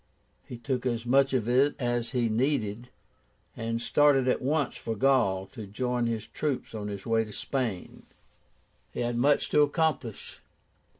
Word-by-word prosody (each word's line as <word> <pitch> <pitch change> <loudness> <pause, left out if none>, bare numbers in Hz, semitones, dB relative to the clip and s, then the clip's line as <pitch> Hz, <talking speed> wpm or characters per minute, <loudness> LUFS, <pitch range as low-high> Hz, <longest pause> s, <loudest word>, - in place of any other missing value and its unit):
He 125 - -9
took 130 +1 -2
as 120 -1 -2
much 135 +2 +3
of 125 -4 0
it 135 +4 +3
as 120 -2 -1
he 125 -3 0
needed, 115 -1 -1 0.7
and 115 0 -3
started 135 +1 +3
at 125 - +1
once 145 0 0
for 115 - -4
Gaul 105 -6 +2
to 110 -5 -8
join 125 +3 -1
his 110 -2 -3
troops 145 -2 -3
on 105 -2 -5
his 100 -1 -6
way 115 -1 +2
to 105 - -10
Spain. 115 -5 -4 0.8
He - - -4
had 120 0 -1
much 140 +5 +2
to 150 - +5
accomplish. 145 -6 -1
120 Hz, 160 wpm, -28 LUFS, 115-135 Hz, 0.8 s, to